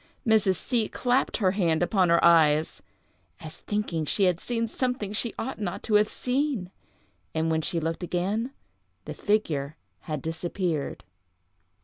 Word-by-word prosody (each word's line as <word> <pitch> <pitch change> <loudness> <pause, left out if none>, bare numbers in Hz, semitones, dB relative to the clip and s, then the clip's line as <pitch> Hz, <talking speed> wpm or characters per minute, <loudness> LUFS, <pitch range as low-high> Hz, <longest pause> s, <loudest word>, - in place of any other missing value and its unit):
Mrs. 215 -4 +4
C—— 230 +4 -1
clapped 250 +1 +1
her 190 -5 +2
hand 175 -4 +1
upon 185 -1 +2
her 170 0 +4
eyes, 160 -2 +4 0.6
"as 155 -1 -9
thinking 205 -6 -2
she 195 +6 0
had 180 -3 +3
seen 230 -1 -2
something 250 -4 -2
she 225 +2 -1
ought 265 -4 -4
not 180 -4 -3
to 220 - -2
have 210 +1 +5
seen," 250 -7 -1 0.6
and 160 0 +1
when 160 0 +1
she 170 +1 -1
looked 165 +2 -3
again 195 +8 -1 0.5
the - - -5
figure 155 -9 -1 0.3
had 150 -3 -3
disappeared. 165 -1 -3
185 Hz, 145 wpm, -27 LUFS, 165-220 Hz, 0.6 s, have